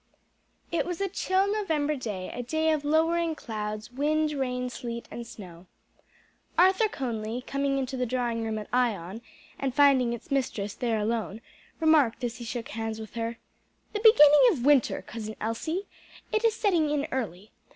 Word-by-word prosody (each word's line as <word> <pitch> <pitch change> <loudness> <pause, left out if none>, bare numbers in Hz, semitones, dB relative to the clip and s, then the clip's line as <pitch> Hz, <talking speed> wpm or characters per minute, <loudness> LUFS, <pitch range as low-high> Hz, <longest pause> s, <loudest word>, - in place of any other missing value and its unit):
_ - - -43 0.7
It 335 - 0
was 355 -2 -3
a 395 - 0
chill 380 0 +1
November 310 -8 0
day, 210 -8 -5
a 245 - -4
day 315 +6 +1
of 305 -2 0
lowering 325 +2 +2
clouds, 215 -3 -5
wind, 305 +3 +1
rain, 250 -3 -2
sleet 235 -1 -6
and 235 -1 -7
snow. 180 -5 -11 0.9
Arthur 380 +5 +5
Conly 235 - -4
coming 275 0 0
into 265 0 -2
the 250 -1 -1
drawing 240 -2 -1
room 220 -1 -2
at 210 - -6
Ion 225 -5 0 0.4
and 265 -2 -2
finding 275 -4 +5
its 235 +2 -7
mistress 225 -7 -1
there 235 -3 -1
alone, 220 -1 -2 0.4
remarked 300 -7 +3
as 235 -1 -2
he 240 - -8
shook 230 0 -5
hands 225 0 -4
with 220 -1 -9
her, 230 0 -3 0.6
"The 420 - -1
beginning 355 -10 +8
of 260 - -3
winter, 285 -3 +3
Cousin 220 -2 -7
Elsie! 315 - -2 0.5
It 435 +1 +1
is 455 -1 +3
setting 350 -9 +2
in 295 -1 0
early. 210 -6 -4
255 Hz, 170 wpm, -27 LUFS, 225-310 Hz, 0.9 s, beginning